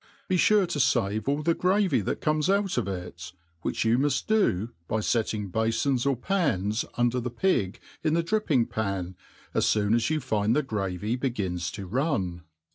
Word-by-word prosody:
Befure 190 +2 +4
to 150 - -2
fave 110 -5 +1
all 145 +2 0
the 165 - +3
gravy'that 180 - +1
conies 155 +2 +1
out 200 -1 +2
of 120 -5 0
it, 90 -2 -6 0.3
which - - -1
you 115 +2 +3
Q|uft 145 +1 +1
do 120 - +1 0.2
by 110 - 0
fetting 105 -3 -1
b^fpns 120 +5 +1
or 140 - +3
pans 115 - 0
under 120 +1 +2
the 125 +1 -3
pig 120 - 0 0.2
in 155 0 +2
the 170 - +2
dripping 165 - +1
^pai7« 100 -6 -3 0.4
as - - +2
foon 105 0 +2
as 115 +3 +2
you 155 0 +1
find 110 -4 0
the 150 - +2
gravy 105 -2 -2
begins 100 -10 -2
to 100 - -6
run. 95 - -1
120 Hz, 170 wpm, -27 LUFS, 100-155 Hz, 0.4 s, Befure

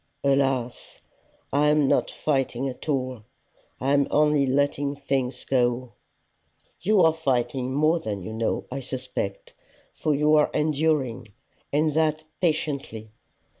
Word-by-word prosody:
"Alas! 135 -3 0 0.6
I 145 +1 +3
am 150 -1 +3
not - - +2
fighting 135 -3 -1
at 130 +4 -7
all; 130 -4 -1 0.6
I 135 +2 +1
am 140 -1 +3
only 150 -2 +3
letting 140 +1 0
things 135 -3 -2
go." 125 -1 0 0.9
"You 205 +2 +3
are 160 -2 +5
fighting 130 -4 -1
more 155 +3 +3
than 105 - -4
you 110 - -6
know, 110 0 -1
I - - -3
suspect, 130 -6 -5 0.4
for 155 -2 0
you 150 +2 +3
are 150 - +4
enduring, 150 -6 0 0.4
and 150 +1 +2
that 155 0 +1 0.2
patiently. 140 -10 -2
140 Hz, 130 wpm, -25 LUFS, 125-150 Hz, 0.9 s, are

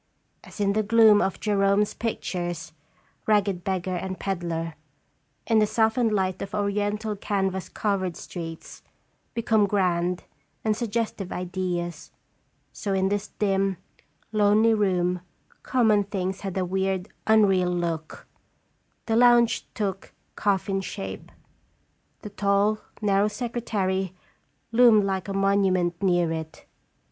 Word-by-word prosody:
As - - -13
in 200 -1 +2
the 215 - +2
gloom 215 -1 +6
of 190 - -1
Gerome's 200 0 +2
pictures, 175 -7 -4 0.5
rag 210 -2 +4
ged 185 -4 -3
beggar 185 -1 -2
and 185 +1 -4
peddler, 170 -4 -3 0.7
in 225 -1 +3
the 215 - +3
softened 225 +1 +2
light 190 -2 0
of 195 - -5
oriental 205 +1 -1
canvas 190 -2 -2
covered 190 -4 -1
streets, 165 -2 -8 0.5
become 220 -3 +2
grand 180 -3 0 0.4
and 215 -1 +2
suggestive 225 -4 -3
ideals, 175 -2 -3 0.6
so 200 - -3
in 190 0 +1
this 205 +1 -1
dim, 195 -2 +1 0.5
lonely 215 +1 +4
room 180 -4 +1 0.4
common 220 -5 +3
things 190 -1 -3
had 195 -2 -4
a 185 - +1
weird, 190 +1 -1 0.2
un 220 -1 +6
real 185 -2 +2
look; 170 -3 -3 0.8
the 225 - 0
lounge 240 -1 +4
took 195 -3 -3 0.2
coffin 195 -1 0
shape; 95 - -7 0.9
the 210 - -7
tall, 200 +1 +2 0.2
narrow 200 0 +3
secretary 205 -5 -2 0.6
loomed 230 -3 +6
like 190 -1 -2
a 195 - -3
monument 190 -3 +1
near 175 -3 +2
it. 160 -1 -6
195 Hz, 120 wpm, -25 LUFS, 180-210 Hz, 0.9 s, gloom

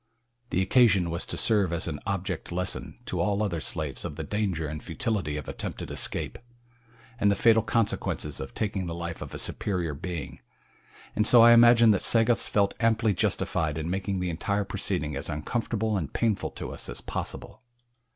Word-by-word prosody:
The 95 - +1
occasion 95 -5 +4
was 85 +2 -3
to - - -3
serve 105 -6 +3
as 85 0 -1
an 75 -3 -4
object 95 -3 -3
lesson 90 +1 -3
to - - -3
all 105 0 +1
other 90 -6 -1
slaves 75 -5 -3
of 75 - -5
the 80 - -5
danger 95 -3 -2
and 75 0 -6
futility 105 - -2
of 75 - -6
attempted - - -5
escape, - - -1 0.8
and 105 - +4
the 100 - +3
fatal 115 +1 +5
consequences 110 0 -1
of 65 - -7
taking 100 -4 -2
the 85 - -4
life 85 -1 -5
of - - -7
a - - -4
superior 90 -6 -2
being, 85 0 -6 0.8
and 105 - +2
so 120 -2 +8
I 120 - +8
imagine 120 -1 +7
that 100 - +2
Sagoths 115 +1 +3
felt 100 -1 +2
amply 110 -1 +2
justified 80 -3 0
in 80 +2 -3
making 95 0 -2
the 90 -1 -1
entire 100 +5 -1
proceeding 75 -4 -2
as 70 - -3
uncomfortable 110 +7 -2
and 80 -8 -3
painful 110 -4 0
to - - -7
us - - -6
as - - -4
possible. - - -5
95 Hz, 180 wpm, -27 LUFS, 80-110 Hz, 0.8 s, so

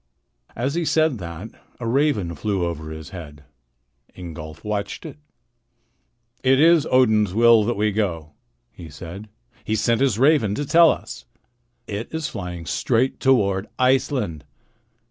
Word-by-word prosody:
As 130 +4 -2
he 170 +1 -1
said 155 -6 +1
that, 85 +4 -7 0.3
a 120 - -5
raven 115 - +1
flew 100 -2 -2
over 80 -2 -5
his 80 -3 -9
head. 75 -4 -10 0.7
Ingolf 80 -3 -9
watched 105 +7 -4
it. 150 -2 -9 1.2
"It 130 0 +4
is 160 0 +5
Odin's 110 -6 +3
will 115 -1 +6
that 120 - 0
we 105 +1 +1
go," 85 -7 -2 0.4
he 85 - -11
said. 90 +7 -9 0.3
"He 110 - -1
sent 115 +3 +1
his 130 -7 +2
raven 130 -6 +3
to 145 - -3
tell 165 +3 +6
us. 115 +2 -4 0.6
It 105 +2 -6
is 160 -1 -3
flying 90 -3 -6
straight 125 +8 0
toward 100 -7 +2
Iceland." 125 - +1
110 Hz, 140 wpm, -22 LUFS, 90-130 Hz, 1.2 s, will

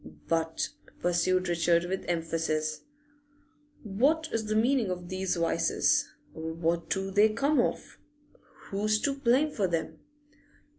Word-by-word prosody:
'But,' 165 0 0 0.3
pursued 185 +1 +1
Richard 170 0 +2
with 190 +2 -3
emphasis, 160 -2 -1 1.0
'what 280 +10 +1
is 225 -1 -1
the 215 - 0
meaning 235 -1 +2
of 180 -1 -5
these 185 0 -1
vices? 170 -1 +1 0.2
What 165 +1 -2
do 195 0 -1
they 205 +3 +5
come 275 +7 +2
of? - - -3 0.7
Who's 215 +2 +1
to 280 - +1
blame 275 +3 +2
for 200 -8 0
them? 160 -2 -3
185 Hz, 120 wpm, -29 LUFS, 170-220 Hz, 1.0 s, they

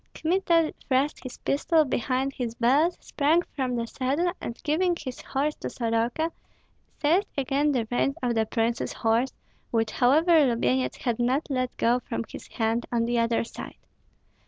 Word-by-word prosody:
Kmita 335 -2 +2
thrust 270 +2 +1
his 255 - -8
pistol 310 +2 +2
behind 260 +1 -1
his 235 -3 -4
belt, 280 +9 +3
sprang 315 +4 +2
from 255 -3 -1
the 235 -1 -1
saddle, 280 +9 -1
and 235 - -5
giving 345 +4 +2
his 260 -4 -6
horse 290 +3 -1
to - - -5
Soroka, 235 +7 -1 0.7
seized 345 +7 +2
again 280 +2 +1
the 240 -5 0
reins 275 +3 +1
of 245 -1 +1
the 220 -1 +1
prince's 230 +1 -1
horse, 230 +4 +1 0.4
which 225 -1 0
however 310 +5 +4
Lubyenyets 130 - 0
had 240 -2 -2
not 255 +5 +1
let 255 -1 -1
go 240 +2 +3
from 230 -2 -4
his - - -10
hand 225 +1 -1
on 230 -1 +1
the 240 0 +1
other 230 0 +1
side. 230 - -9
255 Hz, 160 wpm, -26 LUFS, 235-300 Hz, 0.7 s, however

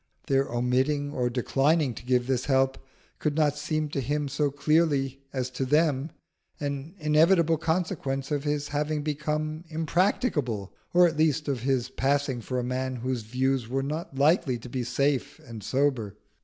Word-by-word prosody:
Their 135 0 +2
omitting 130 +4 +1
or 125 -4 0
declining 135 +3 +1
to 115 - -10
give 125 0 +2
this 130 -1 0
help 135 -1 +2 0.4
could 150 -2 -1
not 150 -2 +2
seem 155 +1 -1
to 140 - -2
him 145 +3 -1
so 145 +1 +1
clearly 145 -2 +1
as 130 -1 -3
to 130 +1 -2
them 150 +1 +2 0.5
an 145 +3 -4
inevitable 165 +1 +4
consequence 160 -5 -1
of 145 -2 0
his 145 -1 -1
having 150 +1 -1
become 155 +1 -2
impracticable, 155 - 0 0.2
or 180 0 +6
at 165 -3 0
least 155 -1 +2
of 135 -3 0
his 130 0 0
passing 135 -1 0
for 125 +3 -3
a 125 - 0
man 130 +1 -2
whose 125 0 -2
views 130 +2 0
were 135 +3 -1
not 150 +1 -4
likely 145 -2 +3
to 120 +2 -10
be 125 0 -2
safe 140 +3 0
and 115 -3 -9
sober. 130 -5 0
140 Hz, 165 wpm, -27 LUFS, 130-150 Hz, 0.5 s, or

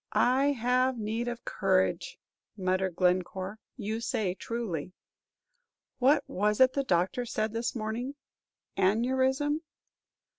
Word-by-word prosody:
"I 270 +3 +3
have 250 +1 +1
need 225 +2 -2
of 240 -1 -5
courage," 190 -2 +1 0.4
muttered 185 -1 0
Glencore; 185 +3 0 0.2
"you 220 -1 -3
say 210 -6 -1
truly. 185 -7 -4 1.1
What 275 +4 +4
was 210 +2 0
it 260 0 +6
the 275 - 0
doctor 185 +2 +1
said 220 -2 -2
this 230 +2 -2
morning, 235 +5 -3 0.6
aneurism?" 260 +9 +2
225 Hz, 110 wpm, -29 LUFS, 190-255 Hz, 1.1 s, it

